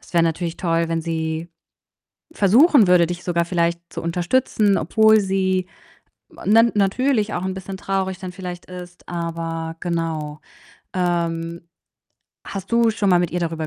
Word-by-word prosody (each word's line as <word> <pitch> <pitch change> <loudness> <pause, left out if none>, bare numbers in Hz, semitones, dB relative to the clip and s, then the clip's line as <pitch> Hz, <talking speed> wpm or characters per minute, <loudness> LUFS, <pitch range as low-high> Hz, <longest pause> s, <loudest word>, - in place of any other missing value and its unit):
Es - - -19
wäre 170 -1 +4
natürlich 165 +1 -2
toll, 165 -1 0
wenn 165 0 -1
sie 160 0 -3 0.9
versuchen 235 - +5
würde, 180 -1 +5
dich 175 +1 -5
sogar 170 -1 0
vielleicht 170 -1 0
zu - - -4
unterstützen, 195 +4 +1
obwohl 220 +6 +4
sie 190 -2 0 0.8
nen 225 +3 +5
natürlich 215 +2 +1
auch 175 - -3
'n 190 0 -2
bisschen 190 0 -7
traurig 190 -1 -2
dann 185 -1 -7
vielleicht 180 -1 -7
ist, 180 -1 -11
aber 165 -1 -4
genau. 160 -4 -3 0.5
Ähm, 170 -2 -2 0.8
hast 195 -1 -7
du 235 -1 +4
schon 205 -2 -1
mal 180 - +5
mit 175 -2 -1
ihr 175 - -1
darüber 165 -2 -2
180 Hz, 150 wpm, -21 LUFS, 165-195 Hz, 0.9 s, versuchen